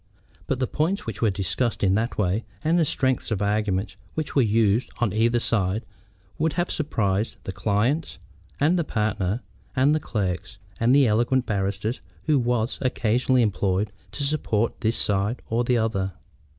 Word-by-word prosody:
But 135 - 0
the 130 - +1
points 165 +10 -1
which - - -5
were 115 - +4
discussed 100 +5 -1
in 95 -1 +4
that 110 +4 0
way, 100 +2 +1 0.2
and 165 +2 +3
the 165 - +4
strength 130 -2 0
of 110 -4 -1
argumentation 100 -2 -1 0.2
which 155 -1 -3
was 130 -5 +4
used 110 +2 +2
on 115 -5 0
either 115 +2 +3
side, 105 -2 0 0.5
would 160 0 +1
have 175 +1 -1
surprised 105 - 0
the - - -4
clients, 105 - 0 0.4
and 165 +5 +3
the - - +2
partner, 105 -4 -1 0.3
and 135 +3 +4
the 155 - +2
clerks, 100 -5 -3 0.2
and 120 +3 +4
the 140 -1 +6
eloquent 120 +3 +2
barrister 100 +1 -1 0.3
who 150 -3 +3
was 120 0 0
occasionally 125 0 +2
employed 100 0 0 0.2
to 145 - -2
support 125 -6 0
this 115 +1 +1
side 100 +4 0
or 115 +2 +2
the 120 0 +2
other. 100 -4 0
115 Hz, 165 wpm, -25 LUFS, 100-130 Hz, 0.5 s, the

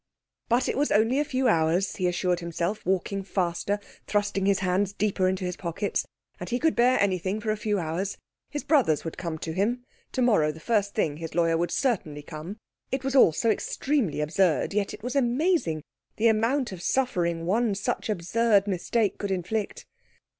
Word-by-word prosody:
But 240 +2 +2
it - - -1
was 295 - +1
only 225 +5 +3
for - - +3
a - - -1
few 260 -2 0
hours, 170 -1 +2
he 180 - +1
assured 180 0 0
himself, 170 +4 -3
walking 190 +1 0
faster, 190 +1 -1 0.3
thrusting 205 -2 0
his 200 -1 +4
hands 190 +1 +1
deeper 200 -2 +1
into 185 0 -1
his 180 -1 -3
pockets, 175 +3 -2 0.3
and - - -6
he 245 - 0
could 320 +4 +1
bear 245 +2 +4
anything 190 +1 0
for 215 0 -1
a - - 0
few 210 -1 -1
hours. 175 +3 -2 0.3
His 295 - -4
brothers 255 - +2
would 165 - -4
come 170 -3 -3
to 160 - -5
him 235 +7 -1 0.3
to 255 - +1
morrow 185 -11 +3
the 155 - -12
first 205 +2 0
thing 150 -9 0
his 165 0 -7
lawyer 165 -1 +3
would 170 +1 0
certainly 170 - -1
come. 160 +6 -8 0.3
It 265 0 -1
was 270 0 -1
all 260 - +7
so 225 +8 +1
extremely 220 - -1
absurd; 165 +1 +1
yet 205 -1 0
it - - -10
was 250 +3 -3
amazing 255 - +1 0.3
the 230 +1 +3
amount 235 +4 +1
of 185 -2 -7
suffering 175 -10 0
one 215 +3 +1
such 220 +3 -2
absurd 205 +2 +2
mistake 205 +2 0
could 200 - -3
inflict. 190 +3 -3
200 Hz, 190 wpm, -26 LUFS, 175-230 Hz, 0.3 s, all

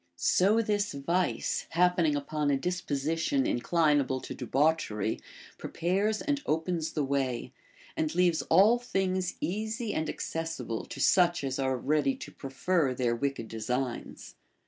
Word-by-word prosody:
t - - -44
So 200 - +3
this 205 -1 0
vice, 170 +6 -1
happening 175 -3 +3
upon 145 +1 -1
a 140 - +3
disposition 165 - -1
inclinable 145 0 +2
to - - -6
debauchery, 130 -5 0 0.4
prepares 200 +5 0
and 290 -2 0
opens 160 +1 -1
the 150 - 0
way, 135 -3 -1 0.4
and 155 +1 -1
leaves 175 -2 +3
all 205 +8 +6
things 190 -6 -1
easy 215 +3 -2
and 155 0 -1
accessible 160 -9 -4
to - - -9
such 175 -4 +3
as 135 0 -2
are 130 -1 0
ready 155 - +1
to - - -9
prefer 140 +1 -1
their 120 -2 +1
Λvicked 135 -2 -2
designs. 125 +3 -4
160 Hz, 135 wpm, -29 LUFS, 135-185 Hz, 0.4 s, all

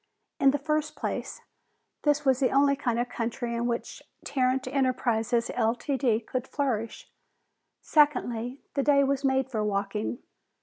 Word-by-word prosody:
In 275 - +6
the 280 - +2
first 305 +1 -1
place, - - -4 0.6
this 295 0 +1
was 265 -2 +3
the 265 - +3
only 280 0 +4
kind 245 -4 -1
of 240 +1 0
country 235 +1 -3
in 235 +1 -1
which 235 -1 -4 0.2
Tarrant 260 -1 0
Enterprises, 245 -3 +1
Ltd., 235 0 0
could 255 0 -3
flourish. 235 -6 -3 0.7
Secondly, 260 -4 +1
the 280 - +1
day 280 0 +4
was 275 0 0
made 265 -1 +1
for 215 -3 -1
walking. 210 +2 -2
255 Hz, 140 wpm, -27 LUFS, 235-280 Hz, 0.7 s, In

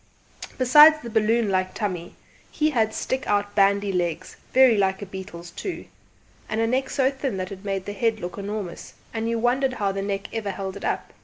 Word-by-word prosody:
Besides 300 +4 +7
the 235 - -7
balloon 220 0 +2
like 185 0 0
tummy 180 -5 -4 0.3
he 310 0 0
had 220 -5 +1
stick 260 +4 -3
out 205 0 0
bandy 200 0 +3
legs, 175 -3 -2 0.2
very 260 -3 +6
like 190 -1 0
a - - -5
beetle's 185 -3 -9
too, 370 - -6 0.6
and 215 - -1
a 225 - +2
neck 260 +3 0
so 270 -1 +2
thin 270 -6 -3
that 185 0 -4
it 195 0 -9
made 195 -2 -3
the 205 - -5
head 225 +1 0
look 175 -2 -6
enormous, 200 -3 -6 0.2
and 225 0 -2
you 230 - 0
wondered 255 +3 +1
how 200 -5 -1
the 195 0 -3
neck 200 0 -2
ever 220 -3 -3
held 190 0 -5
it 200 - -9
up. - - -2
205 Hz, 205 wpm, -24 LUFS, 195-240 Hz, 0.6 s, Besides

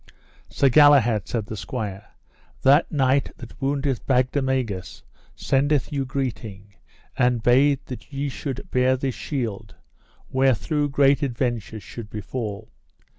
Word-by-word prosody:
Sir 140 - +2
Galahad, 125 -7 +5
said 115 -4 -2
the 110 - -6
squire, 100 0 -6 0.5
that 140 +4 +4
knight 135 -1 +2
that 120 +3 -12
wounded 135 -2 -1
Bagdemagus 130 -6 -1 0.3
sendeth 145 +2 0
you 140 -2 -1
greeting, 110 -6 -5 0.4
and 125 -3 +1
bade 135 +3 +3
that 130 +2 -9
ye 140 +1 -3
should 135 -1 -5
bear 130 +1 +2
this 130 0 -2
shield, 120 -9 -5 0.5
wherethrough 135 +3 +1
great 140 +1 +3
adventures 120 -5 -2
should 115 -3 -9
befall. 110 -1 -6
130 Hz, 120 wpm, -23 LUFS, 115-140 Hz, 0.5 s, Galahad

